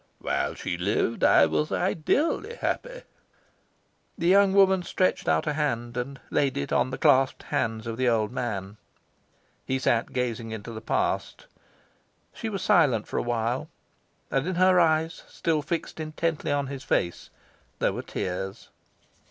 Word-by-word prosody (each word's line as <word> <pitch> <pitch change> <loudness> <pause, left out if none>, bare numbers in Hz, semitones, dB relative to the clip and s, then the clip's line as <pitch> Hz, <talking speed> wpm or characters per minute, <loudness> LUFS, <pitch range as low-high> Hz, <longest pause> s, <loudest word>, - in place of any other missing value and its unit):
"While - - -1
she 85 - -4
lived, 105 +5 0
I 80 - +6
was 75 0 -1
ideally 295 - 0
happy." - - -3 1.1
The 170 - -1
young 195 +1 +6
woman 190 -1 +5
stretched 185 +1 0
out 80 - +2
a 150 - 0
hand, 120 -5 -2
and 135 +3 -4
laid 135 -2 +1
it 70 - -2
on 130 - +2
the 130 - -4
clasped 135 -4 +3
hands 115 -6 -2
of 115 -1 -4
the 130 -1 +2
old 110 -2 +1
man. 105 -5 -4 0.9
He 130 - -1
sat 120 -3 +1
gazing 120 -3 -2
into 110 +1 -6
the 110 -1 -7
past. - - -1 0.9
She 225 - -4
was 195 -3 -4
silent 155 - +3
for - - -4
a - - +2
while; 120 +1 -1 0.6
and 135 +3 0
in 185 - -1
her 185 0 +5
eyes, 160 0 +2
still 160 -2 -1
fixed 165 +3 -4
intently 155 0 -2
on 145 -1 +1
his 135 0 -7
face, 85 -8 -1 0.5
there - - +1
were - - -4
tears. 95 +1 -5
130 Hz, 155 wpm, -26 LUFS, 115-165 Hz, 1.1 s, I